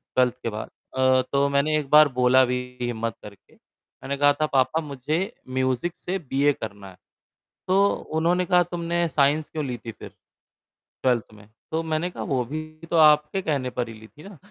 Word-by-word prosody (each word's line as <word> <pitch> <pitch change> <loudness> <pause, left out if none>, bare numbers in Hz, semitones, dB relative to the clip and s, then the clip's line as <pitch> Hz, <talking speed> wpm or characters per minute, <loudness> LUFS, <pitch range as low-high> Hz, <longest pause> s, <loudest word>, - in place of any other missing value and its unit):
12th 125 -1 +2
के - - -1
बाद। 110 0 -6 0.3
अ, 130 0 +4
तो 140 0 +2
मैंने 150 +2 +2
एक 140 -2 -7
बार 150 0 +8
बोला 125 +1 +5
भी 125 0 -1 0.2
हिम्मत 115 -2 -2
करके। 100 -1 -14
मैंने 140 0 -9
कहा 145 0 +5
था, - - +4
"पापा 140 +2 +1
मुझे 145 +1 -3 0.4
म्यूज़िक 130 +6 -1
से 190 +2 -3
बी. 140 -3 -2
ए 145 - +5
करना 100 -4 -8
है।" 90 - -16 0.7
तो 195 +2 +4 0.3
उन्होंने 175 +3 +2
कहा, 180 -1 +4
"तुमने 170 0 -1
साइंस 150 +1 +2
क्यों 155 -2 -4
ली 125 -2 -4
थी 115 - -4
फिर? 110 - -11 0.9
12th 120 -4 +1
में।" 105 -1 -16 0.2
तो 160 +1 -1
मैंने 160 +2 -1
कहा, - - -7
"वो 130 -3 0
भी 155 +6 -4 0.3
तो 170 - +2
आपके 150 +3 +5
कहने 140 -7 -1
पर 125 -1 -3
ही - - -8
ली 110 - -13
थी 150 +6 -17
ना।" 200 - -13
140 Hz, 195 wpm, -24 LUFS, 125-160 Hz, 0.9 s, बार